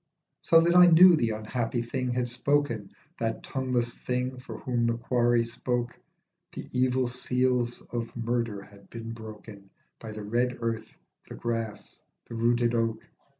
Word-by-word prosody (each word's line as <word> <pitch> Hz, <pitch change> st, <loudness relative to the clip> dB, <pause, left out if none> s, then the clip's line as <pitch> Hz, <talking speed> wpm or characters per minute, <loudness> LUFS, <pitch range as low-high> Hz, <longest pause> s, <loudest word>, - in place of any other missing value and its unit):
So 165 Hz, 0 st, +5 dB
that 170 Hz, +1 st, +2 dB
I 180 Hz, 0 st, +9 dB
knew 175 Hz, +1 st, +8 dB
the 120 Hz, -7 st, +1 dB
unhappy 115 Hz, +2 st, -2 dB
thing 125 Hz, +2 st, -3 dB
had 125 Hz, 0 st, 0 dB
spoken, 125 Hz, -4 st, 0 dB, 0.3 s
That 115 Hz, -1 st, -2 dB
tongueless 125 Hz, -3 st, -1 dB
thing 125 Hz, +1 st, -3 dB
for 115 Hz, -3 st, -8 dB
whom 120 Hz, 0 st, -1 dB
the 115 Hz, 0 st, +1 dB
quarry 120 Hz, 0 st, +2 dB
spoke, 120 Hz, +1 st, -3 dB, 0.6 s
The -, -, -7 dB
evil 130 Hz, 0 st, +1 dB
seals 125 Hz, 0 st, 0 dB
of 120 Hz, 0 st, -5 dB
murder 115 Hz, -3 st, -2 dB
had 100 Hz, -1 st, -18 dB
been 115 Hz, 0 st, -7 dB
broken 110 Hz, -3 st, -10 dB, 0.3 s
By 110 Hz, -1 st, -8 dB
the 105 Hz, -1 st, -7 dB
red 120 Hz, +4 st, 0 dB
earth, 115 Hz, -1 st, -4 dB, 0.3 s
the -, -, -7 dB
grass, 115 Hz, -2 st, -4 dB, 0.3 s
the -, -, -9 dB
rooted 120 Hz, +1 st, +2 dB
oak. 115 Hz, -1 st, -1 dB
120 Hz, 150 wpm, -28 LUFS, 115-125 Hz, 0.6 s, I